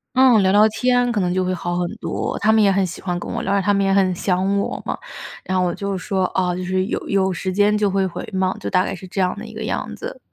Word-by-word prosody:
嗯， 255 -5 +6
聊 190 - +3
聊 210 +2 +6
天 245 +1 +1
可 210 - 0
能 180 -2 0
就 185 0 0
会 185 0 -1
好 175 -1 -3
很 175 -1 -1
多， - - -3
他 215 - +3
们 220 - +4
也 200 -2 +4
很 195 0 +2
喜 180 - -6
欢 180 -2 -2
跟 - - -6
我 - - -3
聊， - - -1
因 200 - +3
为 195 - +1
他 205 - +2
们 200 0 +2
也 195 - +2
很 190 -2 +3
想 190 +2 0
我 200 - -3
嘛。 - - -3 0.5
然 185 - -2
后 185 - +2
我 175 - 0
就 200 +2 -3
说： 190 0 -1
“啊， 180 -1 +1
就 180 +1 -4
是 185 +1 0
有 - - -1
有 190 -1 +1
时 185 +1 -3
间 205 +2 +3
就 210 -1 +2
会 195 0 +1
回 185 - -5
嘛。” 190 0 +1
就 - - -5
大 185 -1 +2
概 - - -3
是 185 0 -8
这 190 +2 -4
样 180 -1 0
的 - - -7
一 - - -11
个 - - -6
样 - - -3
子。 - - -7
190 Hz, 325 characters per minute, -21 LUFS, 185-205 Hz, 0.5 s, 嗯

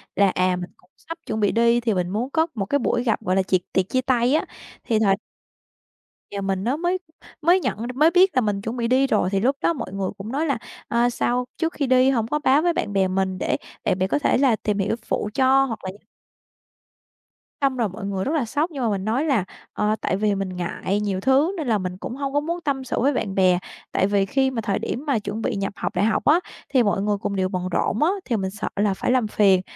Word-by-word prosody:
là, 200 0 +4
à, 185 0 +1
mình 180 0 -6
cũng 180 - -28
sắp 330 +1 -8
chuẩn 220 - -3
bị 205 -2 +2
đi 235 +1 +3
thì 230 -3 0
mình 180 -1 -1
muốn 225 +7 -2
có 320 +2 +1
một 195 - -2
cái 285 +8 +1
buổi 240 0 0
gặp, 225 -3 0
gọi 185 -4 0
là, 190 - +3
tiệc- 185 -1 +1
tiệc 190 0 +1
chia 255 - +1
tay 250 -1 +2
á, 310 - +2 0.4
thì 220 -2 +1
thời 195 -3 +4 1.2
Giờ 200 - -4
mình 195 -1 -1
nó 250 +6 0
mới 350 +3 0 0.4
mới 345 +4 +5
nhận - - -2 0.2
mới 310 +5 +5
biết 370 +2 +6
là 255 - +4
mình 205 -3 -1
chuẩn 225 +3 -4
bị 235 -1 0
đi 260 +2 +3
rồi 185 - +1
thì 195 - +1
lúc 265 +7 +2
đó 335 - +2
mọi 275 - -6
người 195 -1 -2
cũng 210 +4 -7
nói 295 +4 0
là, 280 -6 0 0.3
ờ, 235 +1 +2
sao 245 +1 0
trước 330 -1 -1
khi 280 -3 -1
đi 255 +1 +5
hổng 230 -5 +1
có 300 +5 -1
báo 290 0 +4
với 345 0 +2
bạn 205 -9 -2
bè 190 -1 +3
mình 190 0 -1
để - - 0 0.3
để - - +1
bạn 185 0 0
có - - +1
thể 290 - +2
là 260 -4 +4
tìm 210 -1 -2
hiểu 205 +2 0
phụ 210 - -2
cho 270 +2 +4
hoặc 230 -4 -5
là 185 - -4
như 195 - -15 1.6
Xong 270 -2 +1
rồi 230 -4 +1
mọi 195 +2 -7
người 195 -1 -2
rất 285 - -1
là 285 -6 +1
sốc 295 +9 -1
nhưng 275 -4 -4
mà 230 - +2
mình 200 -1 -2
nói 245 +8 0
là, 265 - +2 0.3
ờ, 210 +1 +1
tại 190 - 0
vì 210 -1 +1
mình 195 -1 -2
ngại 180 +3 -2
nhiều 200 -3 -1
thứ 265 - +3
nên 310 -6 -3
là 220 - +3
mình 185 -2 -4
cũng 235 - -6
hông 275 0 -3
có 290 - +3
muốn 340 +4 -3
tâm 275 -3 -1
sự 260 - -2
với 280 +4 +2
bạn 200 -6 -2
bè, 185 -2 +4 0.3
tại 190 - +2
vì 200 -1 +2
khi 265 +6 +1
mà 230 -3 -2
thời 200 -2 -1
điểm 275 +6 -4
mà 275 -6 +1
chuẩn 205 +2 -5
bị - - -1
nhập 195 0 -2
học - - -4
đại 190 +4 +2
học 220 - 0
á 315 +4 +5 0.3
thì 255 -3 +3
mọi 205 -2 +1
người 205 0 0
cùng 200 - -3
đều 185 -1 0
bận 185 -1 -3
rộn 215 - +1
á 320 - +4 0.2
thì 240 - 0
mình 190 -1 -2
sợ 210 - -5
là 200 -1 +2
phải 220 - -1
làm 255 -4 +2
phiền. 195 -3 +4
225 Hz, 265 wpm, -23 LUFS, 195-270 Hz, 1.6 s, biết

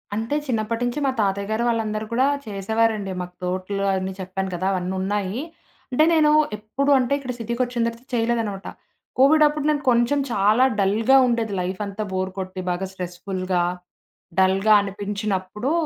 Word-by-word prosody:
అంటే, 225 +7 -2
చిన్నప్పటి 225 -1 -1
నుంచి 245 +4 -2
మా 270 - +2
తాతయ్యగారు 200 +3 0
వాళ్ళందరూ 220 -2 -1
కూడా 255 +3 +3 0.2
చేసేవారండి. 215 0 0
మాకు 180 0 -7
తోట్లు 185 +2 -2
అన్నీ 190 0 -2
చెప్పాను 190 +1 -3
కదా! 185 +2 -2
అవన్నీ 185 0 -2
ఉన్నాయి. 200 +3 -2 0.5
అంటే, 255 +5 +4
నేను 305 -2 +5 0.3
ఎప్పుడు 260 +7 -1
అంటే 255 +2 0
ఇక్కడ 260 -2 -5
సిటీకొచ్చిన 235 +1 -1
తర్వాత 235 +2 -7
చేయలేదనమాట. 225 -4 -1 0.5
కోవిడప్పుడు 300 +1 +4
నేను 295 -1 +1
కొంచెం 240 +4 +2
చాలా 210 +3 +3 0.2
డల్‌గా 215 +7 +4
ఉండేది 230 -3 0
లైఫంతా 200 +3 -3
బోర్ 185 0 -2
కొట్టి 185 0 -5
బాగా 185 +2 -2
స్ట్రెస్‌ఫుల్‌గా, 185 0 -2 0.8
డల్‌గా 195 +3 +4
అనిపించినప్పుడు 200 +3 -3
210 Hz, 135 wpm, -23 LUFS, 190-235 Hz, 0.8 s, నేను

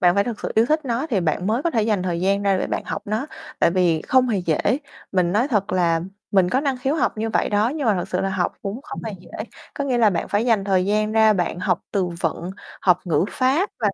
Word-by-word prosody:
bạn 175 0 +4
phải 200 0 +3
thực 235 -3 -5
sự - - -4
yêu 225 +2 +4
thích 310 +1 +1
nó 250 +4 -1
thì 200 - +2
bạn 170 +2 -1
mới 230 +6 +1
có 340 - +1
thể 225 -8 +1
dành 210 -4 +1
thời 175 -2 -2
gian 195 +2 +1
ra 195 -2 +2
để - - -1
bạn - - -3
học - - -4
nó, 220 +7 -2 0.3
tại - - +4
vì 170 -3 +2
không 255 -1 +3
hề 210 -4 +1
dễ. 165 -4 0 0.5
Mình 180 -2 +2
nói 230 +7 +2
thật 210 -5 0
là 170 -3 +2 0.3
mình 190 -3 +3
có 260 - +2
năng 275 -3 0
khiếu 270 +4 0
học 270 -7 0
như 225 +1 -1
vậy - - +1
đó 210 +2 +2
nhưng 290 0 -3
mà 215 - +4
thật 175 - -3
sự 180 - -1
là 195 - 0
học 185 -2 -1
cũng 200 +5 -4
không - - -8
hề 220 - -4
dễ. - - -16 0.5
Có 280 - -2
nghĩa 255 -3 0
là 220 -3 +5
bạn 170 - -2
phải 205 +3 +1
dành 225 -5 +2
thời 190 -2 +2
gian 215 +1 +1
ra 220 -1 +5
bạn 175 -3 -1
học 185 - 0
từ 195 -3 0
vựng, 170 +2 -2 0.3
học 180 -1 +3
ngữ 165 0 +2
pháp 270 +9 +1
và 215 - +3
205 Hz, 275 wpm, -22 LUFS, 180-235 Hz, 0.5 s, là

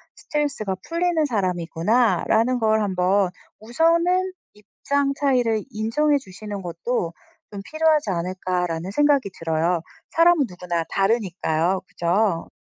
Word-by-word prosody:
스트레스가 280 -10 -2
풀리는 335 -1 +1
사람이구나.'라는 220 - +1
걸 220 -1 +2
한번 190 -1 +1 0.3
우선은 335 - +2 0.2
입장 275 +7 -2
차이를 245 -6 +1
인정해 255 +8 +1
주시는 205 -3 -7
것도 170 +1 -3 0.4
좀 200 -1 -6
필요하지 310 -4 +2
않을까 180 +1 -2
라는 165 +3 -4
생각이 285 -2 +2
들어요. 165 +1 0 0.3
사람은 330 -3 +4
누구나 175 -2 -3
다르니까요. 190 -4 0
그죠? 175 0 0
215 Hz, 300 characters per minute, -23 LUFS, 180-280 Hz, 0.4 s, 사람은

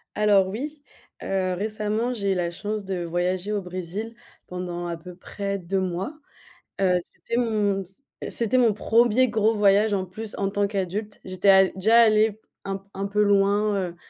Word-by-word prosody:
Alors 205 -2 +4
oui, 285 +9 -6 0.4
heu, 185 -1 -1
récemment 215 +3 -1
j'ai 200 -4 0
eu - - -3
la 175 -1 -1
chance 210 +3 -4
de 185 -2 -3
voyager 180 +3 -1
au 205 -1 -1
Brésil 185 +5 -5 0.3
pendant 180 -1 -5
à 170 - -3
peu 175 +2 -11
près 200 +2 -4
2 190 +1 -2
mois, 185 - -3 0.7
heu, 180 -2 +3
c'était 235 - -6
mon 210 -5 +1
c 190 +1 -14 0.4
c'était 235 +2 0
mon 235 -4 +4
1er 235 +4 +3
gros 220 0 +2
voyage 205 +1 +4
en 190 -2 0
plus 210 +4 -7
en 195 -1 0
tant 205 0 +1
qu'adulte. 200 +1 -4
J'étais 185 +1 0
al 190 -1 +6
déjà 220 +5 +4
allée 215 -1 +3 0.3
un 195 0 -4
un 195 +1 -3
peu 210 +1 +2
loin, 205 +1 +3
heu, 180 -3 -3
200 Hz, 175 wpm, -24 LUFS, 185-215 Hz, 0.7 s, al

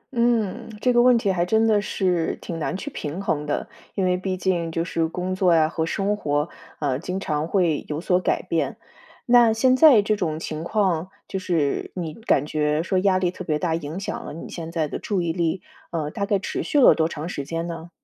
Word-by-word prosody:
嗯， 235 -2 +1
这 250 +2 +2
个 240 - +5
问 245 -1 +6
题 200 -4 +1
还 175 -2 +1
真 220 +5 +2
的 215 -2 +3
是 180 -5 0
挺 165 -2 -6
难 175 - -2
去 290 +9 -6
平 155 - -5
衡 155 -7 -1
的。 145 - -2 0.3
因 195 - +1
为 180 0 +2
毕 185 0 -3
竟 175 -3 0
就 165 +1 -1
是 165 -2 0
工 180 +3 -3
作 185 -2 +3
呀 155 -1 +4
和 160 0 -2
生 195 +4 0
活， 150 -5 -1 0.3
啊， 140 -3 -1
经 180 +3 -4
常 155 -4 -2
会 170 -5 +1
有 150 +1 -3
所 180 +1 +2
改 - - 0
变。 - - -1 0.5
那 240 -2 +6
现 255 +3 +3
在 260 -7 +7
这 215 +1 +1
种 155 -6 -2
情 155 -1 -5
况， 185 -3 0 0.2
就 190 - -3
是 165 -6 -1
你 165 -4 -4
感 185 - +1
觉 150 +1 0
说 185 +1 +1
压 190 -1 +3
力 180 -1 +1
特 185 - -8
别 155 -4 0
大 165 +1 -1
影 160 +2 -4
响 200 - -4
了 - - -7
你 165 - -8
现 165 -1 -6
在 165 -2 0
的 - - -5
注 195 -4 -1
意 165 -1 -1
力， 170 +1 -1 0.3
呃， 155 -3 -3
大 200 +4 -3
概 200 - +2
持 190 - -3
续 295 - +1
了 265 - +8
多 160 -1 +1
长 160 -1 -6
时 145 -5 -4
间 165 +3 -3
呢？ 165 0 -7
180 Hz, 245 characters per minute, -23 LUFS, 160-200 Hz, 0.5 s, 了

